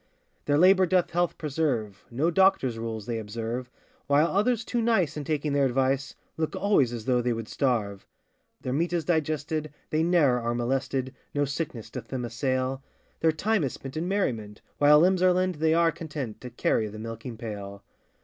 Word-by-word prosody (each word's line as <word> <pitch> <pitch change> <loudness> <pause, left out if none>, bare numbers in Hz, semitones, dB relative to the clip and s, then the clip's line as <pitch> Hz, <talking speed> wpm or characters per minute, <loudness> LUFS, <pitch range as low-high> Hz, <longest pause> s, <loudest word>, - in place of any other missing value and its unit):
Their 145 0 +2
labour 185 +2 +6
doth 180 0 +2
health 175 0 0
preserve, 135 -10 -2
No 145 +8 0
doctor's 180 -11 +3
rules 110 -2 -4
they 115 -1 -2
observe, 115 +3 -4 0.4
While 145 +2 +4
others 235 +3 +2
too 240 -1 -1
nice 225 -10 +2
in 150 -2 -5
taking 150 -1 -1
their 140 -1 +3
advice, 135 +1 0 0.2
Look 160 -1 -2
always 200 - +2
as 115 -3 -6
though 125 -2 +2
they 120 0 0
would 115 -1 -5
starve. 110 -8 -1 0.5
Their 130 - -3
meat 170 +5 0
is 170 -2 0
digested, 155 -2 -1 0.2
they 155 - +2
ne'er 160 -7 +3
are 120 0 -2
molested, 130 +1 -1 0.2
No 145 0 +2
sickness 140 -5 -5
doth 120 -3 -7
them 125 -1 -3
assail; 130 +2 -1 0.4
Their 160 - +3
time 205 +5 0
is 135 - -1
spent 135 +1 -9
in 160 +3 -2
merriment, 115 - -2 0.2
While 150 +1 +7
limbs 185 +1 +3
are 185 -1 +5
lent, 185 -3 0
they 160 0 +3
are 170 0 +4
content, 145 -10 -6
To 125 - -7
carry 115 -2 0
the 105 +1 -9
milking 115 +2 -7
pail. 100 -3 -7
140 Hz, 185 wpm, -27 LUFS, 120-165 Hz, 0.5 s, While